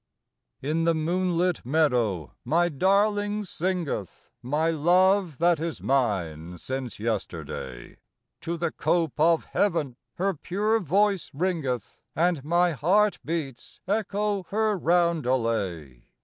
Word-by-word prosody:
In 160 +4 0
the 165 -1 +3
moonlit 175 +2 0
meadow 120 - +1
my 175 +2 +2
darling 205 +5 +1
sing 180 -2 -2
eth, 100 -9 -6
My 150 +6 0
love 180 +1 +3
that 170 -1 +3
is 165 -1 -3
mine 90 - -1
since 130 +4 -5
yesterday; 100 - -5 0.4
To 170 +1 -4
the 170 - -1
cope 165 -5 0
of 165 +1 +3
heaven 160 -11 0 0.2
her 195 +2 0
pure 205 +7 0
voice 195 - +1
ringeth, 140 - -2
And 170 -3 +1
my 175 +3 +2
heart 190 - +2
beats 150 -7 -5
echo 205 0 0
her 215 0 +1
roundelay. 120 - 0
165 Hz, 115 wpm, -26 LUFS, 130-185 Hz, 0.4 s, the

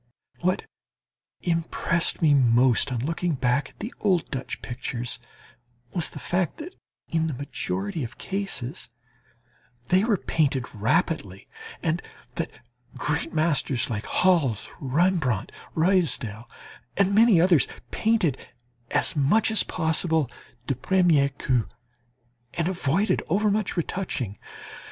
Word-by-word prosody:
...What 185 +1 0 0.8
impressed 170 0 0
me 150 -2 +6
most 125 -1 +4
on 125 0 -2
looking 165 +1 -1
back 130 +1 +1
at - - -25
the 230 - -5
old 185 -6 +1
Dutch 130 -1 -5
pictures, 125 -1 -3 0.7
was 170 -3 +1
the - - -11
fact 180 -1 -1
that 340 +4 -8 0.4
in 160 -1 +1
the 150 - -3
majority 185 +5 -3
of 120 -1 -7
cases 190 -10 -3 1.0
they 185 +2 +4
were 220 -3 +2
painted 140 -7 0
rapidly, 110 - -1 0.4
and 165 +2 0 0.3
that - - -3 0.5
great 150 +3 -1
masters 145 -5 +1
like 105 -1 -3
Hals, 165 - +2
Rembrandt, 140 - +1 0.2
Ruysdael, 140 - +2 0.5
and 200 0 +3
many 220 -3 +6
others, 170 -4 +4 0.2
painted 215 - +1 0.5
as - - +1
much 165 +11 +3
as 220 - +4
possible 160 -4 +1 0.3
du 135 - 0
premier 160 0 +3
coup 130 -4 0 0.9
and 170 -1 0
avoided 185 +2 +1
overmuch 205 +2 +1
retouching. 160 - -2
160 Hz, 115 wpm, -25 LUFS, 130-185 Hz, 1.0 s, me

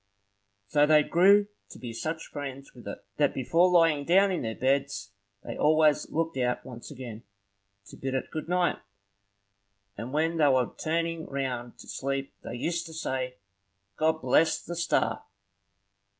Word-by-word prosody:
So 145 +8 +3
they 155 -1 +6
grew 200 +6 +5 0.2
to - - -11
be 120 -2 -7
such 160 +7 -4
friends 140 -2 -7
with 120 -4 -13
it, 100 - -7
that 145 -1 +2
before 165 +8 +3
lying 165 -5 +4
down 190 +5 +4
in 180 - -1
their 110 -2 -3
beds, 135 -7 0 0.3
they - - -6
always 155 0 +3
looked 165 -2 -1
out 125 -1 -1
once 120 -2 -9
again, 125 -6 -8 0.6
to - - -13
bid 135 0 -3
it 130 - -3
good 155 +1 -5
night; 180 -1 +1 1.2
and 115 +5 -6
when 160 +3 +1
they 150 -2 +5
were 130 -3 +2
turning 165 0 -2
round 125 -3 -4
to - - -13
sleep, 135 0 -3
they - - -6
used 170 +7 -2
to 160 - -10
say, 130 -5 -3 0.6
"God 160 +3 +1
bless 160 +5 +3
the 175 - -7
star!" 170 0 0
145 Hz, 160 wpm, -28 LUFS, 130-165 Hz, 1.2 s, they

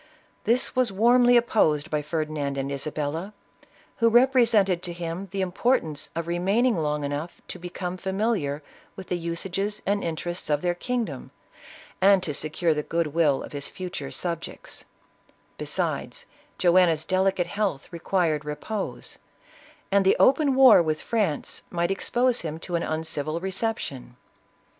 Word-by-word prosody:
This 240 +3 +1
was 255 -4 +2
warmly 245 +4 +5
opposed 160 -11 +2
by 150 -1 0
Ferdinand 150 -2 -3
and 135 +1 -2
Isabella, 155 +7 -4 0.6
who 230 -1 +4
rep 250 +4 +5
resented 210 -8 +3
to 175 -1 -5
him 170 +2 -5
the 195 +2 -3
importance 180 - 0
of 170 0 -2
remaining 195 +8 +1
long 150 -2 -1
enough 145 +4 -4
to - - -7
become 180 +1 -5
familiar 190 -7 -1 0.3
with 190 -2 -10
the 180 - 0
usages 185 +5 -3
and 200 +1 0
inter 165 +1 -3
ests 175 - -5
of 150 +1 +1
their 175 -1 +2
kingdom, 240 +6 -3 0.7
and 195 -1 +5
to 150 - -2
secure 155 +3 0
the 150 - -1
good 165 -1 -2
will 155 -5 +2
of - - -9
his 145 -1 -5
future 185 -1 -6
subjects; 170 -2 -6 0.7
besides, 485 -1 -3 0.3
Joanna's 175 -3 +4
delicate 190 0 +1
health 190 -6 -2
required 170 -3 0
repose, 190 +8 -5 0.7
and 200 0 +4
the 190 - +4
open 275 0 +4
war 260 -7 +8
with 155 -2 -1
France 210 -10 -1
might 175 +1 -1
expose 245 +5 +1
him 155 -1 -4
to 175 - -4
an 170 - 0
uncivil 155 -1 -2
reception. 190 - -4
175 Hz, 145 wpm, -25 LUFS, 155-205 Hz, 0.7 s, war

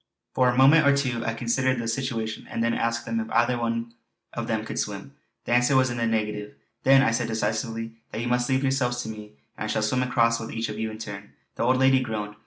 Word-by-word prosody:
For 125 -1 +3
a 125 - 0
moment 140 +3 +6
or 140 0 +5
two 125 -4 -1
I 115 - -2
considered 130 +2 0
the 115 -1 -3
situation, 115 -3 -3
and 115 - -2
then 115 0 +1
asked 115 0 -1
them 115 0 -1
if 110 0 -4
either 120 +2 +2 0.8
of - - -4
them - - -1
could - - -4
swim. - - -4 0.3
The - - -4
answer 125 +3 +3
was 130 -1 +3
in 120 - -4
the 115 0 0
negative. 105 -2 -2 0.3
"Then," 135 0 +6
I 115 - +3
said 115 +1 0
decisively, 115 +1 -3
"you 115 +2 -3
must 125 0 +1
leave 130 +1 +1
yourselves 125 -2 0
to - - -6
me, 105 -1 -9 0.2
and - - -4
I - - -3
shall 110 - 0
swim 125 +4 +1
across 115 -2 +2
with 115 - -6
each 115 0 -2
of - - -6
you 110 0 -1
in 110 - -8
turn." 100 -2 -8 0.2
The - - -5
old 125 +2 +3
lady 130 0 +5
groaned. 110 -4 -4
115 Hz, 240 wpm, -25 LUFS, 110-130 Hz, 0.8 s, moment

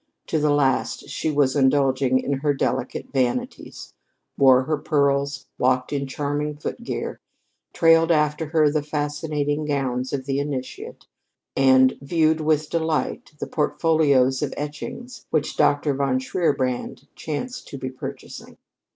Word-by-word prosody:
To 160 - -1
the 150 0 +2
last, 140 -3 +1
she - - -2
was 145 -3 +2
indulging 130 -1 +3
in 140 - -1
her 145 0 +1
delicate 130 -1 -2
vanities 125 -3 -2 0.4
wore 130 -1 +5
her 155 +3 -1
pearls, 140 -2 0
walked 130 +2 +1
in 140 -1 -2
charming 145 +2 -3
foot 235 +10 -6
gear, - - -4 0.5
trailed 165 0 +4
after 150 -1 +1
her 155 -1 +3
the 155 0 0
fascinating 150 0 -2
gowns 130 -3 -2
of 135 -2 -3
the 135 0 -1
initiate, 140 -3 -5 0.5
and 130 -1 +4
viewed 160 +2 +2
with 155 -1 +1
delight 160 -3 -1
the - - -4
portfolios 145 -4 +2
of 150 - -2
etchings 155 - -7
which 155 -2 -1
Dr. 145 0 +2
von 135 -1 0
Shierbrand 130 -2 -1
chanced 245 - -5
to 140 - -7
be 130 -1 -5
purchasing. 130 - -9
145 Hz, 135 wpm, -23 LUFS, 135-155 Hz, 0.5 s, wore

